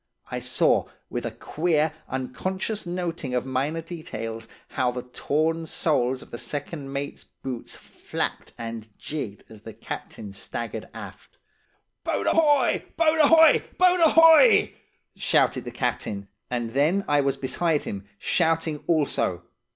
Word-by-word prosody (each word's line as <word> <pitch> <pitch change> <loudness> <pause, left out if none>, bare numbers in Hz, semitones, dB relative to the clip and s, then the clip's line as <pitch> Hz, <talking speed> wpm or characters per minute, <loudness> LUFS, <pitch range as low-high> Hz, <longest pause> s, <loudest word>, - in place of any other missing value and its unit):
I - - -2
saw, - - +2 0.2
with - - -2
a - - -4
queer, 155 -1 0 0.2
unconscious 185 - -3
noting 170 -7 -3
of 125 - 0
minor 135 +5 -1
details, 115 -10 -6 0.2
how 125 - 0
the 125 0 -4
torn 155 +6 -1
soles 130 -6 0
of - - -18
the 120 - -5
second 145 -1 -4
mate's 140 +1 -4
boots 130 -3 -7
flapped - - -5
and 115 -1 -6
jigged 130 -10 -5
as 110 -2 -14
the 110 0 -9
captain 100 -2 -7
staggered 115 +3 -5
aft. - - -10 0.7
"'Boat - - -1
ahoy! 295 -6 +3
Boat 325 -1 +3
ahoy! 320 +2 +7
Boat 365 0 +5
ahoy!' 330 +7 +7 0.4
shouted - - +2
the - - -4
captain; 100 -1 -2 0.2
and 120 -2 -2
then 160 +10 +2
I 145 -1 +3
was 140 -1 0
beside 150 +3 0
him, 100 0 -6
shouting 160 - 0
also. 145 - +1
145 Hz, 135 wpm, -25 LUFS, 125-175 Hz, 0.7 s, ahoy